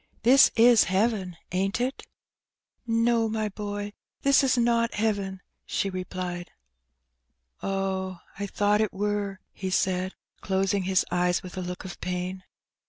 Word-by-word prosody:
"This 260 +4 +7
is 230 0 +7
heaven, 190 -2 0
aint 195 +4 0
it?'' 255 +2 -1 0.9
No, 230 0 +2
my 215 -1 -1
boy, 205 0 -5 0.3
this 275 0 +5
is 260 -1 +3
not 235 -1 +2
heaven," 200 -3 -1 0.2
she 195 - -1
replied. 180 -1 -4 1.1
Oh, 190 -1 -2 0.2
I 200 - -2
thought 205 +2 +2
it 215 - 0
wur," 205 0 -1
he 190 - -4
said, 185 0 0 0.3
closing 195 0 0
his 190 0 +2
eyes 180 0 +1
with 185 - -9
a 185 - -3
look 180 0 -6
of 185 - -8
pain. 180 +1 -3
195 Hz, 135 wpm, -27 LUFS, 185-220 Hz, 1.1 s, This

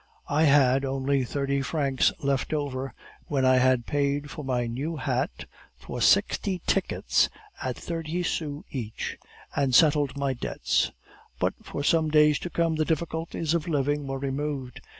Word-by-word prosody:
I 150 +2 +3
had 135 -2 +5
only 135 0 0
thirty 140 +2 -1
francs 135 -2 +1
left 140 +2 0
over, 135 -3 -3 0.4
when 135 -3 +1
I 130 0 +5
had 130 -2 +3
paid 145 0 -1
for 150 - -7
my 125 -2 0
new 135 +8 -3
hat, 135 +1 -2 0.3
for - - -7
sixty 190 -3 +3
tickets 60 +1 +2 0.3
at 130 -2 -3
thirty 165 +1 -3
sous 150 -3 -3
each, 115 -5 -5 0.4
and 135 -3 +2
settled 145 -3 +4
my 140 -1 0
debts; 120 - 0 0.5
but - - +1
for 140 - -5
some 160 +1 +3
days 150 -1 +5
to 175 - -5
come 165 -2 0
the 155 - +2
difficulties 160 0 -2
of 170 0 -1
living 145 -2 0
were 135 0 -3
removed. 135 -1 -3
140 Hz, 150 wpm, -27 LUFS, 130-155 Hz, 0.5 s, had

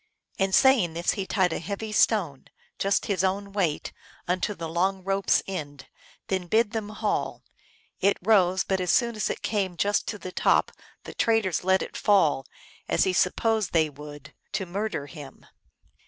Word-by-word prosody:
" - - -33
And 195 0 +2
saying 245 -12 +4
this, 170 +1 +1
he 195 -2 -4
tied 180 -4 +1
a - - -3
heavy 200 +6 -5
stone, 190 - +1 0.3
just 195 0 +1
his 195 -3 0
own 200 +1 -1
weight, 180 -7 -1 0.3
unto 185 +3 -1
the 165 -2 -5
long 185 +3 0
rope 195 +1 -2
s - - +4
end, 145 -7 -7 0.4
then 185 -2 -2
bid 220 +3 +2
them 220 -2 -4
haul. 215 0 -2 0.6
It 200 +1 +2
rose, 185 -2 +3
but 190 -1 -1
as 180 -1 +4 0.3
it - - -5
came 195 -5 -1
just 205 +2 +1
to 210 - -3
the 185 -2 -8
top - - +2 0.3
the - - -9
traitors 220 -8 +1
let 190 +1 +3
it - - -9
fall, 155 -10 +2 0.4
as - - +3
he 190 - +1
sup 180 0 +2
posed 220 -5 0
they 160 -2 +2
would, 145 0 -11 0.2
to 195 -1 -1
murder 195 -4 -3
him. 145 -2 -12
190 Hz, 175 wpm, -26 LUFS, 170-205 Hz, 0.6 s, saying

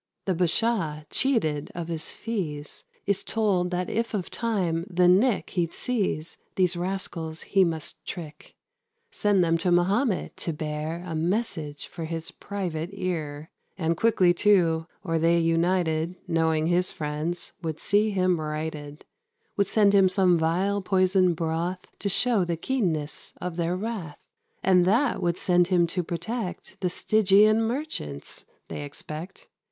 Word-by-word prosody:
The 190 - +1
Bashaw, 175 -3 0
cheated 160 - 0
of 170 -1 -4
his 165 -2 -2
fees, 160 -10 -4 0.2
Is 200 -1 0
told 195 -5 +1
that 180 0 -2
if 230 0 -1
of 185 -4 -3
time 185 -7 -1
the 180 -1 +3
nick 200 +5 +3
He'd 170 -2 -1
seize, 195 -10 -1 0.2
these 180 -1 +4
rascals 175 -3 -3
he 195 -1 +3
must 165 -3 -3
trick 155 -5 -8 0.6
Send 205 -3 +2
them 165 0 +2
to 175 +2 +1
Mahomet, 195 +5 +1
to 165 - -2
bear 155 +2 -4
A 165 - -4
message 160 -4 -2
for 165 - -7
his 165 0 -3
private 175 -5 -4
ear; 160 -6 -4 0.3
And 165 -2 0
quickly, 185 -3 +4
too, 170 -4 +3 0.2
or 165 -4 0
they 165 +1 +4
united, 165 0 +1
Knowing 160 -2 +1
his 175 +2 +2
friends, 155 +3 -4
would 160 -2 -4
see 210 +2 +2
him 185 -4 +1
righted; 150 -1 -5 0.5
Would 200 -2 +2
send 205 -1 +4
him 195 -2 +6
some 185 -2 +4
vile 180 +5 +1
poison 185 -2 +3
broth, 170 +3 -2
To 200 - -1
show 225 +1 +3
the 170 -1 -2
keenness 165 - -2
of 180 -1 -4
their 170 +1 0
wrath; 195 -8 -5 0.5
And 180 -1 +5
that 230 +8 +2
would 175 -1 0
send 175 -1 +3
him 180 -2 +3
to 180 - +1
protect 190 +2 -5
The 180 - +1
Stygian 215 +3 +4
merchants, 225 - -4 0.2
they 145 - -5
expect. 155 +5 -8
175 Hz, 145 wpm, -26 LUFS, 160-195 Hz, 0.6 s, him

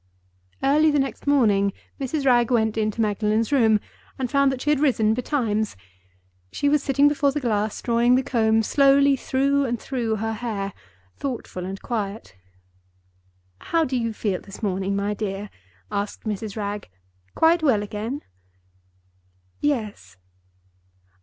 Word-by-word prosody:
Early 300 +3 +4
the 295 - +2
next 270 +1 -2
morning 205 -8 +3 0.3
Mrs. 275 +1 -2
Wragge 240 -3 +4
went 220 -3 +2
into 215 0 -1
Magdalen's 215 +2 0
room, 225 -6 +4 0.4
and 255 -2 -3
found 280 -1 +3
that 265 - -4
she 295 +3 0
had 300 - +2
risen 230 -7 +3
betimes. 225 -4 -1 0.8
She 285 - -1
was 295 0 +3
sitting 280 +1 +3
before 290 -1 +2
the 295 - -2
glass, 215 -5 -1
drawing 240 +1 +3
the 260 - +2
comb 225 -3 +2
slowly 275 +3 +4
through 275 +2 +1
and 240 -2 -2
through 235 -4 -2
her 225 +1 -2
hair—thoughtful 195 - -6
and 195 +1 -6
quiet. 205 - -4 1.2
"How 330 -1 +1
do 260 - -3
you 230 -2 0
feel 205 -3 -2
this 195 +2 -12
morning, 195 0 -1
my 200 +1 -1
dear?" 205 -1 -4 0.4
asked 200 0 -3
Mrs. 215 -1 -4
Wragge. 205 - -4 0.5
"Quite 330 +1 +4
well 250 -9 +3
again?" 215 +6 -5 1.4
"Yes." 210 - -2
230 Hz, 140 wpm, -23 LUFS, 210-275 Hz, 1.4 s, Early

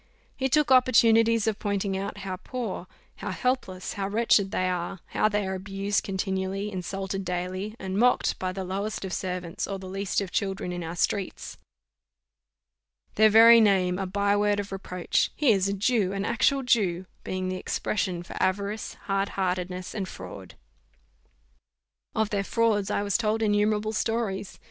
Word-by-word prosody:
He 265 0 -1
took 300 0 +3
opportunities 230 -3 +5
of 220 -2 -1
pointing 200 -1 -1
out 195 +1 -4
how 185 -1 -3
poor, 215 -4 -5 0.3
how - - -5
helpless, 190 -3 -2
how 195 -2 -2
wretched 210 -2 +3
they 185 -2 0
are; 180 +1 -3
how 215 - +2
they 210 -1 0
are 190 - -2
abused 195 +1 -2
continually, 190 +1 -2
insulted 195 +1 -4
daily, 185 +4 -3
and 190 -1 -3
mocked 250 +1 +3
by 185 0 -2
the 190 +1 -4
lowest 195 +3 -3
of 185 - -5
servants, 180 -3 -3
or 195 - -3
the 190 - -10
least 195 +1 -2
of 195 -2 -4
children 195 -2 -2
in 175 -1 -4
our 165 +1 -5
streets; 195 +2 -2 1.5
their 220 0 +5
very 230 +2 +8
name 185 -3 +3
a 195 - -2
by 200 +2 +1
word 205 0 +2
of 200 -1 -5
reproach: 180 -2 -1
"He 290 -5 +4
is 195 -2 +2
a 200 - 0
Jew 200 -1 +1
an 195 0 -2
actual 270 +3 +2
Jew," 195 -8 +1 0.2
being 185 0 -3
the 185 - -2
expression 185 -2 -2
for - - -10
avarice, 200 +3 -1
hard 195 0 0
heartedness, 180 -1 -2
and 195 -3 -3
fraud. - - -9 1.6
Of 220 -2 0
their 200 -1 0
frauds 215 -2 +1
I - - 0
was 200 +2 +1
told 220 0 0
innumerable 210 +1 +1
stories. 220 -4 -2
200 Hz, 165 wpm, -27 LUFS, 185-215 Hz, 1.6 s, very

